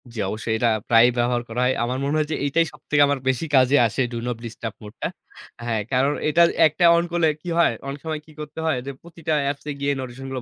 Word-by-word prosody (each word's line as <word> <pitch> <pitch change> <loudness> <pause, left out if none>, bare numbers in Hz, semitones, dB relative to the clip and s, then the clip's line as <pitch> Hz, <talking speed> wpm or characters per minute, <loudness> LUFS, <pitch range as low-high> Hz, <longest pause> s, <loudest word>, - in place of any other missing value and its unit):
জি 115 - -7
অবশ্যই 110 +1 -2
এটা 120 +1 +2 0.2
প্রায়ই 115 +1 +6
ব্যবহার 120 0 +1
করা 120 +2 -2
হয়। 130 - +2
আমার 125 +2 -2
মনে 140 +2 0
হয় 155 -1 0
যে - - 0
এটাই 165 +4 +2
সবথেকে 145 -1 0
আমার 140 -1 0
বেশি 130 +5 0
কাজে 130 +1 +5
আসে 115 - -2
do - - -3
not 120 -2 -2
disturb 115 -1 -6
মোডটা। 105 0 -5 0.6
হ্যাঁ 115 -2 0
কারণ 135 +3 +2 0.2
এটা 160 +3 +3 0.3
একটা 165 +3 +1
on 170 - +2
করলে 170 -2 +2
কি 175 - -6
হয়, 170 - +4
অনেক 140 +1 -5
সময় 155 -1 -3
কি 155 - -17
করতে 150 +1 -7
হয় 160 -5 +1
যে 140 - -4
প্রতিটা 165 -2 -4 0.2
apps 140 - -11
এ - - -1
গিয়ে 140 0 0
notification 130 +1 -7
গুলো 130 -1 -4
135 Hz, 235 wpm, -23 LUFS, 120-155 Hz, 0.6 s, প্রায়ই